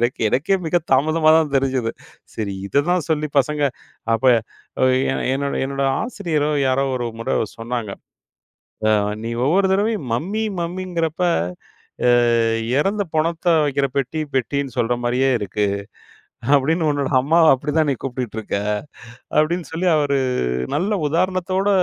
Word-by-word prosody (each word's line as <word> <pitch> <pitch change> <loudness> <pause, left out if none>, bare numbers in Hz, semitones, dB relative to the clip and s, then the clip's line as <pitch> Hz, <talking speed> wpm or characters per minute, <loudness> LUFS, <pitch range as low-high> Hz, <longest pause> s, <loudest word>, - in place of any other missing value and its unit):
எனக்கு 120 - -2
எனக்கே 155 - +1
மிக 160 - +1 0.2
தாமதமா 155 +4 +3
தான் 155 -3 +1
தெரிஞ்சுது. 130 -4 0 0.4
சரி 105 -3 -3
இததான் 165 - +1
சொல்லி 150 -1 +1
பசங்க, 150 +2 0 0.5
அப்ப 115 - -3 0.6
அ - - +6 0.3
என் - - -2
என்னோட, 140 0 -2
என்னோட 135 0 -2 0.2
ஆசிரியரோ 170 -10 -1 0.2
யாரோ 135 +1 +2
ஒரு 120 - -2
முறை - - -1 0.2
சொன்னாங்க. 115 -2 -4 1.0
ஆ - - +4 0.3
"நீ 115 - -3 0.2
ஒவ்வொரு 190 +6 +3
தடவையும் 205 - 0
மம்மி 195 - -1 0.2
மம்மிங்கிறப்ப 170 -1 -3 0.9
அ - - +6 0.7
இறந்த 200 +7 +1
பொணத்த 165 +2 -1 0.2
வைக்கிற 140 -1 +1
பெட்டி 140 +3 -1 0.2
பெட்டின்னு 135 0 -1
சொல்ற 120 +1 +1
மாரியே 125 +3 +2
இருக்கு. 105 +1 -1 0.9
அப்டின்னு 155 +4 +2
உன்னோட 145 -2 -1
அம்மாவ 160 +4 +4
அப்டிதான் 150 +3 0
நீ 135 - +1
கூப்பிட்டுட்டு 125 -4 -4
இருக்க." 105 - -3 0.8
அப்டின்னு 170 +3 +1
சொல்லி 180 +3 0
அவரு 145 -2 +1 0.6
நல்ல 195 +5 0
உதாரணத்தோட 185 +4 0
150 Hz, 130 wpm, -21 LUFS, 130-170 Hz, 1.0 s, அ